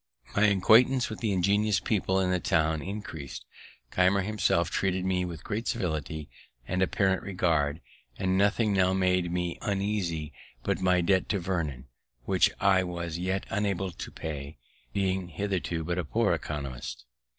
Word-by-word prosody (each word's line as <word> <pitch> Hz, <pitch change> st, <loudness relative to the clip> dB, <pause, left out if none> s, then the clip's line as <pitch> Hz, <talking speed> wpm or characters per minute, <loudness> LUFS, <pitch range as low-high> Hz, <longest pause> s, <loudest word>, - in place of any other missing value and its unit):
My 100 Hz, +1 st, +5 dB
acquaintance 115 Hz, +6 st, +5 dB
with 110 Hz, -, -7 dB
ingenious 100 Hz, +1 st, +2 dB
people 95 Hz, -3 st, +1 dB
in 90 Hz, -1 st, +1 dB
the 90 Hz, -, +2 dB
town 80 Hz, -1 st, +1 dB
increased. 95 Hz, -9 st, -6 dB, 0.5 s
Keimer 95 Hz, +2 st, +3 dB
himself 95 Hz, -4 st, +1 dB
treated 95 Hz, -1 st, 0 dB
me 90 Hz, -1 st, +1 dB
with 85 Hz, -4 st, -7 dB
great 110 Hz, +2 st, -3 dB
civility 80 Hz, -, -2 dB, 0.4 s
and 95 Hz, +1 st, -1 dB
apparent 95 Hz, 0 st, +2 dB
regard, 80 Hz, -5 st, 0 dB, 0.4 s
and 95 Hz, -1 st, 0 dB
nothing 100 Hz, +2 st, +3 dB
now 95 Hz, -1 st, +3 dB
made 90 Hz, -2 st, +2 dB
me 90 Hz, -1 st, -2 dB
uneasy 95 Hz, -, -1 dB, 0.3 s
but -, -, -1 dB
my 90 Hz, -1 st, +3 dB
debt 95 Hz, +1 st, +2 dB
to 100 Hz, -, +1 dB
Vernon, 80 Hz, -8 st, -2 dB, 0.4 s
which 95 Hz, -2 st, +4 dB
I 95 Hz, -2 st, +4 dB
was 85 Hz, -2 st, -4 dB
yet 95 Hz, +2 st, -1 dB
unable 95 Hz, -2 st, -1 dB
to -, -, -8 dB
pay, 75 Hz, -2 st, -6 dB, 0.3 s
being 95 Hz, -2 st, 0 dB
hitherto 90 Hz, -2 st, -2 dB
but 85 Hz, +2 st, -2 dB
a -, -, 0 dB
poor 75 Hz, -, +1 dB
æconomist. 65 Hz, -4 st, -5 dB
95 Hz, 150 wpm, -28 LUFS, 85-100 Hz, 0.5 s, My